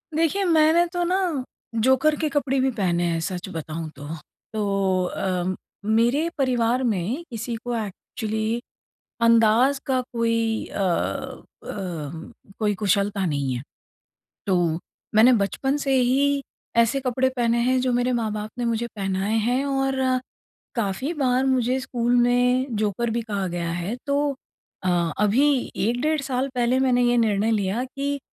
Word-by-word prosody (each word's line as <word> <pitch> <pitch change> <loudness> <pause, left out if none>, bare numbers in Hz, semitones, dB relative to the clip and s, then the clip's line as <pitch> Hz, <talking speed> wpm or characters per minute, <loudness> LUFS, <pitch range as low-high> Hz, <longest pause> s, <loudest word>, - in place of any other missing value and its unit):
देखिए, 330 +5 +2
मैंने 325 -1 +4
तो 350 0 0
ना 355 +2 +1 0.6
जोकर 265 +6 +3
के 310 - 0
कपड़े 275 -2 0
भी 265 +1 +2
पहने 175 -4 +1
हैं 165 -1 0
सच 180 +2 -4
बताऊँ 160 -1 -5
तो। 145 +1 -9 0.5
तो 195 -3 +1
अ, 185 0 -1 0.3
मेरे 240 +8 +3
परिवार 250 -2 +1
में 225 - -1
किसी 230 0 -4
को 240 +1 -4
एक्चुअली 220 +3 -3 0.6
अंदाज़ 230 +4 +4
का 260 -1 +2
कोई 230 -1 0
अ - - -7 0.9
अम 165 -4 -6 0.3
कोई 210 -2 +1
कुशलता 200 0 +1
नहीं 140 -5 -1
है। 125 - -4 0.8
तो 190 -2 +2 0.6
मैंने 225 +4 +7
बचपन 270 +7 -1
से 275 -2 0
ही 275 +3 +2 0.3
ऐसे 235 +4 +3
कपड़े 255 0 +1
पहने 235 -1 +2
हैं 255 +1 +2
जो 255 0 +1
मेरे 245 +1 +1
माँ-बाप 215 -2 -2
ने 245 - -1
मुझे 235 0 0
पहनाए 195 +1 -1
हैं। 245 +5 +1
और 270 -1 0 0.7
काफ़ी 230 - -1
बार 260 -3 +1
मुझे 255 -1 +2
स्कूल 240 -2 0
में 245 +1 +3
जोकर 215 +2 0
भी 230 +1 -1
कहा 205 -4 -2
गया 170 -1 -3
है 175 +7 -3
तो 285 0 +1 0.5
अ, 175 -3 +1
अभी 255 +6 +3
1 235 +4 0
डेढ़ 310 0 +1
साल 265 0 -1
पहले 245 +1 +2
मैंने 250 -2 +3
ये 240 0 +3
निर्णय 220 -2 +2
लिया 210 +2 0
कि 280 +1 -1
235 Hz, 145 wpm, -24 LUFS, 200-260 Hz, 0.9 s, मैंने